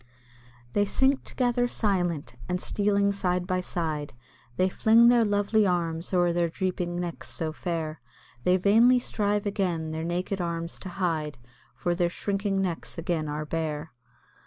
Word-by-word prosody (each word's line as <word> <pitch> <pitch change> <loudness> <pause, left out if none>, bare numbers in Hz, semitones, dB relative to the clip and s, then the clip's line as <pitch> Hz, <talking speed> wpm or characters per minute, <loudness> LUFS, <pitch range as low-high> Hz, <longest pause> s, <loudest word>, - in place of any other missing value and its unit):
They 205 - +3
sink 265 +6 +2
together 245 -1 +1
silent, 175 - -1
and 180 0 0
stealing 200 0 +1
side 180 -2 0
by 185 0 0
side, 155 -7 -3 0.4
They 185 - +3
fling 225 +5 +5
their 240 -1 +5
lovely 205 0 +2
arms 170 -2 -1
o'er 175 -2 +3
their 170 -1 +1
drooping 175 -1 -2
necks 175 -1 -5
so 160 -1 -2
fair, 160 -3 -3 0.4
Then 180 +1 +4
vainly 225 +6 +5
strive 210 -4 0
again 180 -6 -1
their 160 0 -3
naked 180 +3 -2
arms 170 -1 -3
to 190 - -6
hide, 165 -5 -2 0.4
For 175 - -1
their 175 0 +1
shrinking 195 +2 -1
necks 175 -2 -3
again 165 -3 -1
are 150 +1 -3
bare. 155 -1 -3
180 Hz, 150 wpm, -27 LUFS, 165-200 Hz, 0.4 s, fling